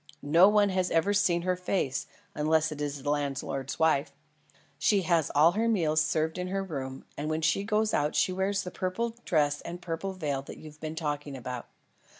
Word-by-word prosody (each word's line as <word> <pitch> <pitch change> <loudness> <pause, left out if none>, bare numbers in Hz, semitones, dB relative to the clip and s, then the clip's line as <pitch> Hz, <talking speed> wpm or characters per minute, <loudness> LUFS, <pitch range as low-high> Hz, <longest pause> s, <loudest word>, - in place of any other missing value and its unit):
No 175 +5 +8
one 210 -1 +4
has 185 -1 0
ever 165 +5 +2
seen 175 -4 +2
her 185 0 +1
face; 180 -7 -1 0.3
unless 155 +1 +2
it 150 -1 -6
is 145 -2 -3
the 145 - 0
landlord's 135 -2 -2
wife. 160 -3 +2 0.7
She 195 +4 +3
has 165 -3 +2
all 155 +4 +6
her 220 +5 0
meals 160 -8 +2
served 160 +2 0
in 180 - -2
her 195 +1 -2
room, 135 -7 -6
and 150 +2 -3
when 155 0 -1
she 195 +5 +2
goes 215 +1 +1
out 150 +1 +1
she 185 - +2
wears 195 +1 0
the 180 - -6
purple 225 +7 -2
dress 145 -3 +1
and 175 +1 -7
purple 175 +2 -4
veil 145 -7 -2
you've 155 -1 -10
been 155 0 -4
talking 145 -3 -3
about. 125 -1 -6
160 Hz, 190 wpm, -29 LUFS, 145-185 Hz, 0.7 s, No